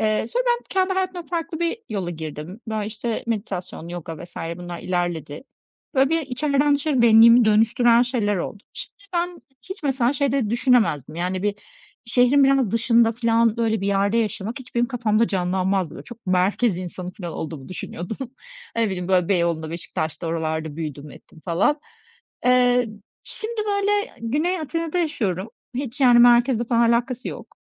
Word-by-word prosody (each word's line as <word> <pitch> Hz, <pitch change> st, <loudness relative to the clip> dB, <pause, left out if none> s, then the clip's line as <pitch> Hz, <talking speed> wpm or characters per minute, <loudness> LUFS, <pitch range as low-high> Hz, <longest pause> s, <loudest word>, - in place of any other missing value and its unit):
Eee, 215 Hz, 0 st, +1 dB
sonra -, -, -1 dB
ben 480 Hz, 0 st, +2 dB
kendi 380 Hz, 0 st, +1 dB
hayatımda 370 Hz, -2 st, -2 dB
farklı 330 Hz, -1 st, -4 dB
bir 340 Hz, +7 st, 0 dB
yola 195 Hz, -5 st, -3 dB
girdim. 160 Hz, +4 st, -7 dB
Böyle, 215 Hz, -2 st, -2 dB
işte, 220 Hz, +1 st, -4 dB
meditasyon, 195 Hz, -7 st, -4 dB
yoga 170 Hz, -1 st, -7 dB
vs. 175 Hz, -, -16 dB, 0.2 s
bunlar 175 Hz, -1 st, -7 dB
ilerledi. 175 Hz, -, -3 dB, 0.5 s
Böyle, 265 Hz, 0 st, +4 dB
bir 330 Hz, 0 st, +2 dB
içeriden 285 Hz, +1 st, +1 dB
dışarı 285 Hz, -3 st, +1 dB
benliğimi 230 Hz, +1 st, +7 dB
dönüştüren 230 Hz, +2 st, +4 dB
şeyler 235 Hz, -5 st, 0 dB
oldu. 195 Hz, +3 st, -5 dB
İşte, 405 Hz, -, -10 dB
ben 350 Hz, 0 st, -2 dB, 0.3 s
hiç 380 Hz, -, -6 dB
mesela 265 Hz, -3 st, +1 dB
şey 280 Hz, -2 st, 0 dB
de 260 Hz, -7 st, 0 dB
düşünemezdim, 230 Hz, -, +2 dB
yani, 180 Hz, +2 st, -2 dB
bir 205 Hz, 0 st, 0 dB, 0.5 s
şehrin 250 Hz, +4 st, +4 dB
biraz 270 Hz, -6 st, +3 dB
dışında 230 Hz, 0 st, +3 dB
filan, 230 Hz, -1 st, +2 dB
böyle, 225 Hz, -2 st, 0 dB
bir 195 Hz, -, -2 dB
yerde 200 Hz, +2 st, +1 dB
yaşamak 220 Hz, 0 st, -2 dB
hiç 255 Hz, -2 st, -13 dB
benim 240 Hz, 0 st, +2 dB
kafamda 230 Hz, -3 st, +1 dB
canlanmazdı. 185 Hz, -1 st, 0 dB
Böyle, -, -, -10 dB
çok 235 Hz, -3 st, -13 dB
merkez 185 Hz, +3 st, +2 dB
insanı 180 Hz, 0 st, -6 dB
filan 175 Hz, -4 st, -7 dB
olduğumu 155 Hz, -3 st, -6 dB
düşünüyordum. 185 Hz, +2 st, -6 dB, 0.6 s
Ne 230 Hz, -1 st, +2 dB
bileyim, 180 Hz, -3 st, -4 dB
böyle, 180 Hz, -2 st, +2 dB
Beyoğlu'nda, 170 Hz, -4 st, 0 dB
Beşiktaş'ta, 165 Hz, 0 st, -4 dB
oralarda 160 Hz, -2 st, -2 dB
büyüdüm 150 Hz, -2 st, -6 dB
ettim 160 Hz, -, -16 dB
falan. 200 Hz, -, +1 dB, 0.6 s
Eee, 250 Hz, -1 st, +4 dB, 0.4 s
şimdi, 440 Hz, 0 st, -5 dB
böyle, 405 Hz, 0 st, +1 dB, 0.3 s
Güney 305 Hz, +10 st, 0 dB
Atina'da 330 Hz, +2 st, -2 dB
yaşıyorum. 215 Hz, -, -1 dB, 0.3 s
Hiç, 265 Hz, +1 st, -5 dB
yani, 245 Hz, -3 st, +6 dB
merkezle 240 Hz, 0 st, +5 dB
falan 235 Hz, 0 st, +3 dB
alakası 245 Hz, +1 st, -1 dB
yok. -, -, -9 dB
230 Hz, 160 wpm, -23 LUFS, 185-265 Hz, 0.6 s, benliğimi